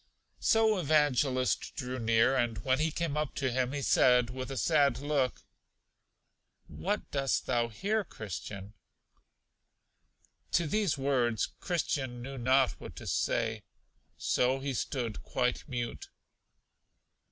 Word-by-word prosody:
So 220 Hz, -2 st, +3 dB
Evangelist 140 Hz, -5 st, +1 dB
drew 125 Hz, 0 st, -4 dB
near, 115 Hz, +3 st, +3 dB
and 120 Hz, -3 st, 0 dB
when 130 Hz, 0 st, +2 dB
he 160 Hz, +1 st, +2 dB
came 160 Hz, -1 st, -2 dB
up 150 Hz, -2 st, -2 dB
to 130 Hz, -3 st, 0 dB
him, 125 Hz, 0 st, 0 dB
he 145 Hz, -1 st, -3 dB
said, 125 Hz, -2 st, +4 dB
with 130 Hz, 0 st, -5 dB
a 135 Hz, -, -5 dB
sad 145 Hz, -5 st, +3 dB
look; 140 Hz, -2 st, -1 dB, 1.2 s
What 205 Hz, +3 st, -3 dB
dost 135 Hz, -2 st, 0 dB
thou 120 Hz, -1 st, +1 dB
here, 205 Hz, -, -1 dB
Christian? 100 Hz, -, -7 dB, 1.8 s
To 170 Hz, -, +3 dB
these 195 Hz, 0 st, +1 dB
words 125 Hz, -5 st, +1 dB
Christian 140 Hz, -8 st, -2 dB
knew 135 Hz, 0 st, -6 dB
not 130 Hz, +2 st, +4 dB
what -, -, -9 dB
to -, -, -9 dB
say, 110 Hz, -2 st, 0 dB, 0.6 s
so 125 Hz, +2 st, +1 dB
he 135 Hz, 0 st, -3 dB
stood 120 Hz, -2 st, -3 dB
quite 125 Hz, -1 st, -1 dB
mute. 120 Hz, -2 st, -4 dB
130 Hz, 125 wpm, -31 LUFS, 120-145 Hz, 1.8 s, said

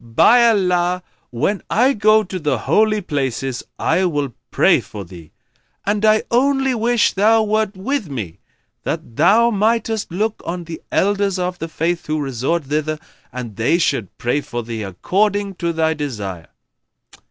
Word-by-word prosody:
by 215 Hz, -, +5 dB
Allah, 180 Hz, -4 st, +1 dB, 0.3 s
when 155 Hz, -, -1 dB
I 255 Hz, +4 st, +3 dB
go 215 Hz, -1 st, +4 dB
to 185 Hz, -1 st, -5 dB
the 150 Hz, -3 st, 0 dB
Holy 215 Hz, -1 st, +2 dB
Places, 135 Hz, -, -2 dB, 0.2 s
I 175 Hz, +4 st, +1 dB
will 145 Hz, -7 st, -1 dB, 0.2 s
pray -, -, +4 dB
for 100 Hz, -2 st, -9 dB
thee; 85 Hz, -3 st, -13 dB, 0.5 s
and 205 Hz, +1 st, 0 dB
I 215 Hz, 0 st, +4 dB
only 270 Hz, +2 st, +2 dB
wish 235 Hz, 0 st, +2 dB
thou 220 Hz, +3 st, +4 dB
wert 215 Hz, -1 st, 0 dB
with 235 Hz, -, -2 dB
me, 110 Hz, -12 st, -6 dB, 0.4 s
that 115 Hz, -, -5 dB
thou 215 Hz, -, +4 dB
mightest 220 Hz, -1 st, 0 dB
look 210 Hz, +5 st, -2 dB
on 175 Hz, +1 st, -4 dB
the 165 Hz, -1 st, -8 dB
Elders 200 Hz, -1 st, +1 dB
of 180 Hz, -1 st, -3 dB
the 165 Hz, -, -4 dB
Faith 165 Hz, +2 st, -2 dB
who 155 Hz, 0 st, -1 dB
resort 140 Hz, +4 st, -1 dB
thither, 155 Hz, +2 st, -2 dB, 0.3 s
and 120 Hz, -5 st, -7 dB
they 115 Hz, +9 st, +2 dB
should 135 Hz, -, -1 dB
pray 125 Hz, +5 st, 0 dB
for 120 Hz, -3 st, -5 dB
thee, 115 Hz, -1 st, -5 dB
according 195 Hz, -, 0 dB
to 170 Hz, -1 st, -1 dB
thy 160 Hz, -1 st, +1 dB
desire." 105 Hz, -, -5 dB
175 Hz, 155 wpm, -19 LUFS, 135-215 Hz, 0.5 s, by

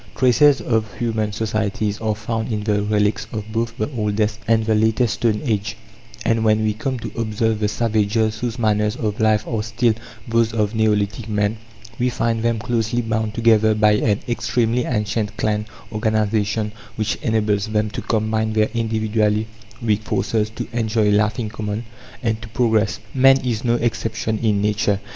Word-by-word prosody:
Traces 135 Hz, +3 st, +5 dB
of 110 Hz, -3 st, 0 dB
human 110 Hz, -3 st, -1 dB
societies 105 Hz, -1 st, -2 dB
are 110 Hz, -1 st, 0 dB
found 110 Hz, +2 st, -3 dB
in 105 Hz, -1 st, -2 dB
the 105 Hz, -1 st, +1 dB
relics 105 Hz, +1 st, 0 dB
of 110 Hz, -1 st, -5 dB
both 115 Hz, +1 st, -2 dB
the 110 Hz, -, -1 dB
oldest 105 Hz, 0 st, 0 dB
and 110 Hz, -1 st, +3 dB
the 110 Hz, -, +2 dB
later 110 Hz, +3 st, +3 dB
stone 110 Hz, -1 st, 0 dB
age; 105 Hz, -3 st, -1 dB, 0.5 s
and, 115 Hz, -1 st, +2 dB
when 110 Hz, 0 st, +3 dB
we 110 Hz, -1 st, +1 dB
come 130 Hz, +5 st, -3 dB
to 115 Hz, -, -6 dB
observe 110 Hz, -1 st, 0 dB
the 105 Hz, -, +1 dB
savages 110 Hz, 0 st, 0 dB
whose 120 Hz, -1 st, -3 dB
manners 105 Hz, -1 st, +1 dB
of 105 Hz, -4 st, -3 dB
life 110 Hz, -1 st, +3 dB
are 115 Hz, -3 st, -1 dB
still 115 Hz, +2 st, +1 dB, 0.3 s
those 115 Hz, -1 st, +2 dB
of 105 Hz, -1 st, 0 dB
neolithic 105 Hz, 0 st, 0 dB
man, 105 Hz, 0 st, +1 dB, 0.4 s
we 125 Hz, +1 st, +2 dB
find 115 Hz, -2 st, -1 dB
them 115 Hz, 0 st, +1 dB
closely 115 Hz, +1 st, -1 dB
bound 110 Hz, -1 st, -2 dB
together 110 Hz, -2 st, +4 dB
by 105 Hz, 0 st, +4 dB
an 105 Hz, -1 st, +1 dB
extremely 120 Hz, 0 st, 0 dB
ancient 105 Hz, -2 st, -1 dB
clan 105 Hz, 0 st, 0 dB, 0.2 s
organization 110 Hz, -1 st, 0 dB, 0.2 s
which 110 Hz, -1 st, -1 dB
enables 105 Hz, -2 st, 0 dB
them 105 Hz, -1 st, 0 dB
to -, -, -4 dB
combine 110 Hz, 0 st, 0 dB
their 110 Hz, 0 st, +2 dB
individually 110 Hz, -2 st, +1 dB, 0.4 s
weak 105 Hz, -1 st, +2 dB
forces, 110 Hz, 0 st, 0 dB
to 110 Hz, -, -6 dB
enjoy 110 Hz, -2 st, +1 dB
life 105 Hz, +1 st, +2 dB
in 115 Hz, -, -2 dB
common, 105 Hz, +1 st, -4 dB, 0.4 s
and 110 Hz, -2 st, 0 dB
to 115 Hz, -, -8 dB
progress. 110 Hz, -2 st, +1 dB
Man 135 Hz, 0 st, +6 dB
is 120 Hz, -1 st, -1 dB
no 120 Hz, -1 st, +2 dB
exception 110 Hz, -2 st, -1 dB
in 105 Hz, -3 st, +1 dB
nature. 105 Hz, -1 st, +1 dB
110 Hz, 170 wpm, -21 LUFS, 105-115 Hz, 0.5 s, Man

